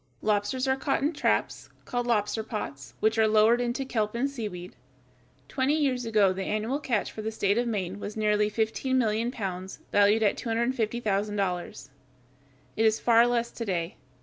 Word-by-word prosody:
Lobsters 215 +5 0
are 265 - +3
caught 270 0 -1
in 300 +4 +1
traps, 295 - -1 0.2
called 245 -1 -2
lobster 215 -1 +1
pots, 140 - -6
which 220 +1 +2
are 220 - +5
lowered 220 +3 +4
into 245 +3 -1
the - - -11
kelp 215 -3 -1
and 250 +4 +1
seaweed. 210 -10 -6 0.7
Twenty 265 - +1
years 260 -6 0
ago 210 -4 +3
the 190 - -5
annual 215 +8 -1
catch 235 -8 -1
for 215 - -7
the 220 +1 -3
state 205 0 +1
of 240 - 0
Maine 195 -3 -3
was 205 +1 -6
nearly 210 -1 +2
fifteen 225 +4 0
million 225 -1 +1
pounds, 190 -5 -5
valued 205 +2 +4
at 205 - +2
$250,000. 210 - -1 0.9
It 220 - +1
is 220 0 +2
far 235 0 +5
less 235 -1 0
to 235 - -5
day. 175 -5 -2
220 Hz, 175 wpm, -27 LUFS, 205-240 Hz, 0.9 s, are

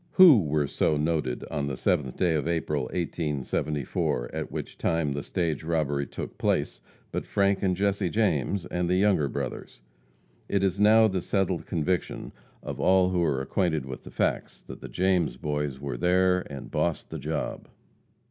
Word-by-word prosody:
Who 170 - +8
were 75 -2 0
so 75 +2 +1
noted 75 -5 -1
on 70 -1 -1
the 70 - -3
7th 65 0 0
day 90 -3 +2
of 80 0 -1
April, 75 -5 -1
1874, 75 -5 -2
at - - -4
which - - -6
time 80 -3 0
the 70 +1 -2
stage 80 -2 -2
robbery 75 -4 0
took - - -7
place, - - 0 0.3
but - - -2
Frank 100 -1 +1
and 95 -2 +1
Jesse 100 -1 0
James, 100 - 0
and 90 -1 -2
the 90 - +3
Younger 95 -6 +3
Brothers? - - -5 0.7
It 100 -1 +1
is 95 0 +1
now 110 +2 +6
the 95 -3 -1
settled 95 -3 -1
conviction 85 +1 -2 0.3
of - - -6
all 95 -1 +4
who 90 -1 0
are 70 -5 +1
acquainted 80 -3 0
with 65 -1 -7
the - - -10
facts, - - -2
that - - -10
the - - -8
James 90 -8 +1
Boys 75 -2 -2
were 70 -3 -4
there 90 +2 +2
and 70 -1 -8
"bossed 75 +2 -1
the - - -5
job." - - -4
85 Hz, 170 wpm, -27 LUFS, 75-95 Hz, 0.7 s, Who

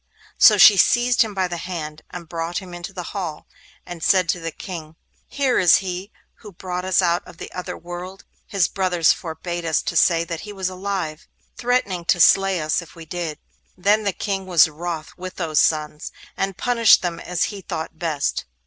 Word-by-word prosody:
So 210 - +8
she 200 +1 +8
seized 240 +6 +4
him 215 -3 0
by 190 -1 +1
the 175 -1 -5
hand, 155 -3 -6
and 170 -2 -9
brought 165 +1 -4
him 185 -3 -7
into 175 +2 -7
the 185 -2 -6
hall, 180 -7 -5 0.4
and 175 -2 -8
said 185 +1 +3
to 175 - +1
the 165 0 -4
King: 160 -2 -8 0.3
'Here 275 -3 +1
is 180 -2 +6
he 185 +2 -3 0.3
who 210 - -12
brought 180 +1 -5
us 185 0 +2
out 170 0 +2
of - - -13
the - - -9
other 180 - -6
world. 175 +3 -8 0.2
His 195 -5 +1
brothers 180 -4 +2
forbade 170 +1 -6
us 160 -2 0
to - - -3
say 165 -2 +4
that 170 -1 -5
he 210 - -8
was 190 -2 -2
alive, 185 -4 -4 0.3
threatening 235 -8 0
to 175 - +2
slay 195 +1 +5
us 155 +2 0
if 170 - -14
we 165 -1 -10
did.' 165 -2 -4 0.4
Then 205 +4 +2
the 200 - +1
King 195 +1 -4
was 175 -5 +6
wroth 160 0 -6
with 185 0 -7
those 160 -4 0
sons, 150 -1 0 0.2
and 195 -1 -2
punished 235 -5 +4
them 170 -1 -2
as 180 0 -2
he 200 - -8
thought 160 -2 -6
best. 155 -4 -1
180 Hz, 195 wpm, -22 LUFS, 165-195 Hz, 0.4 s, So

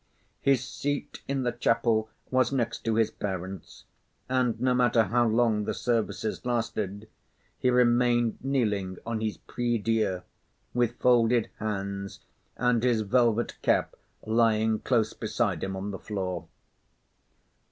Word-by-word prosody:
His 135 -3 +3
seat 145 +2 -4
in 135 -1 -1
the 120 - +1
chapel 115 -2 +1 0.2
was 130 -1 +3
next 130 -4 -1
to 115 -1 +1
his 110 -1 +2
parents, 95 -1 -6 0.4
and 125 -3 +1
no 125 +1 +2
matter 125 -2 +4
how 120 +4 +2
long 110 -2 +2
the - - -2
services 115 -2 -1
lasted, 110 -4 -2 0.5
he 125 - +2
remained 120 -1 +3
kneeling 105 -9 0
on 115 -1 -2
his 110 -1 -2
prie 120 -1 -2
dieu, 105 -4 0 0.5
with 120 -1 +1
folded 120 -2 +3
hands 100 -2 -4 0.4
and 125 -2 +2
his 120 -2 +2
velvet 120 +1 +1
cap - - +1 0.3
lying 110 -1 +2
close 115 -3 +1
beside - - -1
him 95 0 -3
on 100 +2 -4
the 95 - -6
floor. 90 -5 -4
115 Hz, 130 wpm, -28 LUFS, 105-125 Hz, 0.5 s, matter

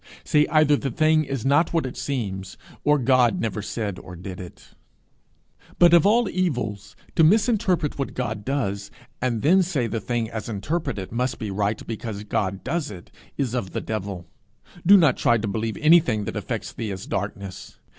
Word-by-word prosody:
Say 150 0 +3
either 155 -2 +4
the 135 - -3
thing 155 +4 +3
is 135 -3 -4
not 145 +5 +3
what 165 -4 +1
it 130 - -5
seems, 95 -9 -4 0.3
or 150 0 +4
God 125 -2 +3
never 110 -2 -2
said 100 -2 -4
or 90 - -10
did 90 +1 -8
it. 90 -2 -11 1.1
But, 175 -1 +6
of 170 +1 +6
all 230 +2 +4
evils, 125 - -2 0.2
to 160 - +5
misinterpret 190 - +2
what 135 - -3
God 110 -4 -3
does, 100 -7 -2 0.3
and 120 -3 -1
then 185 +6 +5
say 165 -9 0
the 115 -1 -3
thing 120 +1 -1
as 110 0 -5
interpreted 115 - -3
must 125 +3 -1
be 110 -4 -4
right 100 +2 -1
because 110 -2 -5
God 100 -2 -2
does 165 -3 -2
it, 90 -4 -11 0.3
is 130 -4 -1
of 110 -7 -3
the - - -1
devil. 100 -5 -4 0.6
Do 200 +3 +8
not 150 -8 +4
try 120 - +3
to 110 0 -3
believe 110 +2 -2
anything 150 -10 +4
that - - -5
affects - - -4
thee 110 -3 -4
as 95 0 -6
darkness. 100 -1 -5
120 Hz, 180 wpm, -24 LUFS, 100-155 Hz, 1.1 s, Do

